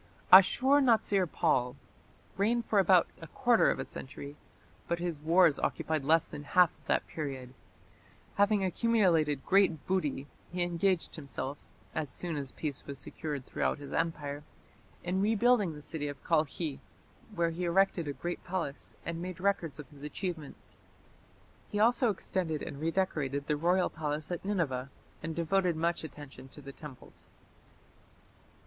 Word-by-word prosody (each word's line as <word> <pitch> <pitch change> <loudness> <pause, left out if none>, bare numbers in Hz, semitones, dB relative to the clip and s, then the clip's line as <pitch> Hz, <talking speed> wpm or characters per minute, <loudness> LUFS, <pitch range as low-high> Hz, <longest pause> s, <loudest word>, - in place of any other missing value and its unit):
Ashur 260 +10 +7
natsir 215 - +3
pal 125 -7 +1 0.6
reigned 230 +4 +1
for 210 - +2
about 185 -2 +5
a 165 - -8
quarter 240 - +3
of - - 0
a - - -4
century, 140 +2 -8 0.5
but 170 - 0
his 170 -3 -3
wars 165 -1 +4
occupied 155 -3 -1
less 160 +3 +4
than 145 - -8
half 180 +3 +4
of - - -28
that - - +1
period. 135 -5 -6 0.8
Having 205 0 +3
accumulated 180 - +2
great 190 -6 +3
booty, 150 -7 -1 0.3
he 180 0 0
engaged 175 +1 0
himself, 140 -1 -5 0.3
as 155 -3 -2
soon 170 +5 -4
as 140 -3 -4
peace 150 -4 -4
was 140 -1 -6
secured 145 -1 -5
throughout - - -1
his 145 -1 -9
empire, 150 -3 -2 0.6
in 185 +2 0
rebuilding 215 -4 +3
the 150 - -10
city 150 -2 -3
of 145 -1 -7
Kalkhi, 155 -2 0 0.6
where 170 -2 +1
he 175 +2 -3
erected 175 -2 +2
a 145 - -2
great 175 +4 -5
palace 175 -6 -4
and 170 0 -3
made 180 0 -6
records 180 -7 0
of 150 -3 -9
his 145 -1 -15
achievements. 155 0 -6 0.9
He 205 - -2
also 235 +2 +4
extended 180 -5 -2
and 140 - -6
redecorated 155 -5 -1
the 150 - +1
royal 180 +4 +2
palace 155 0 -4
at 175 - -3
Nineveh, 145 -10 -1 0.3
and 160 0 -4
devoted 175 +1 +1
much 170 +1 0
attention 145 -4 -10
to 140 +2 -11
the 140 0 -9
temples. 145 -4 -12
165 Hz, 150 wpm, -31 LUFS, 145-185 Hz, 0.9 s, Ashur